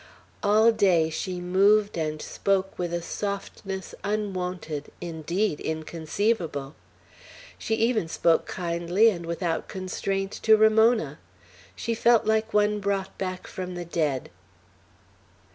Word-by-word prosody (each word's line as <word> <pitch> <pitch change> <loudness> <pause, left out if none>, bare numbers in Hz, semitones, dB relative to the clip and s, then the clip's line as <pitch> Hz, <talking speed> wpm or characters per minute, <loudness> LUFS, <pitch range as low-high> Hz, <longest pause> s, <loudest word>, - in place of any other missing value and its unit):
All 215 +3 +5
day 175 -7 +3
she 180 +3 -3
moved 200 +4 +3
and 155 -2 -2
spoke 195 -1 -1
with 175 -1 -2
a 170 0 -2
softness 195 0 -5
unwonted, 185 -7 -3
indeed 170 +2 -2
inconceivable. 160 -1 -2 0.9
She 225 - -1
even 225 -5 +1
spoke 165 0 +2
kindly 175 +5 +2
and 170 -4 -6
without 170 0 -2
constraint 195 +1 -3
to 220 -1 +6
Ramona. 220 - +4 0.6
She 230 - -2
felt 235 0 +4
like 220 0 +1
one 210 0 +2
brought 200 -1 -2
back 185 -1 -4
from 180 -1 -6
the 175 0 -5
dead. 150 - -1
190 Hz, 115 wpm, -26 LUFS, 170-210 Hz, 0.9 s, to